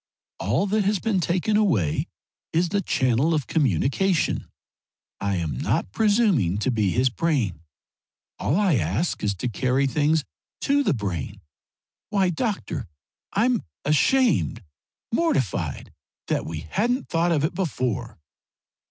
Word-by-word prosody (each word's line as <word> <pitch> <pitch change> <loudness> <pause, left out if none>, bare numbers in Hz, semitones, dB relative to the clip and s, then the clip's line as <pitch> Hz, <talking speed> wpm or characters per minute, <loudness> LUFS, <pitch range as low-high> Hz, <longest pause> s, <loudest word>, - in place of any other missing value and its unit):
All 120 - +1
that 210 +1 +1
has 205 +1 +2
been 195 +1 0
taken 180 +5 0
away 115 - +1 0.5
is 170 +2 +2
the 200 +2 0
channel 130 +1 +2
of 150 - -1
communication. 155 - +1 0.7
I 100 -1 -1
am 80 -6 -2
not - - 0
presuming 205 - +2
to 120 +5 0
be 110 -5 +1
his 125 +6 +2
brain. 125 - 0 0.8
All 140 - +1
I 190 -8 +3
ask 100 - -1
is 100 -1 0
to 95 - -3
carry 130 +3 +1
things 150 +3 +2 0.4
to 285 +1 +2
the 270 - +1
brain. 100 - -4 0.7
Why, 195 -4 +2
doctor, 205 +4 -3 0.5
I'm 230 +2 +2 0.2
ashamed, 155 - +2 0.5
mortified 230 - -1 0.4
that - - 0
we 80 -1 -4
hadn't 245 +5 0
thought 170 +1 +1
of 150 -3 +2
it 155 - 0
before!" 130 - -2
155 Hz, 130 wpm, -24 LUFS, -, 0.8 s, I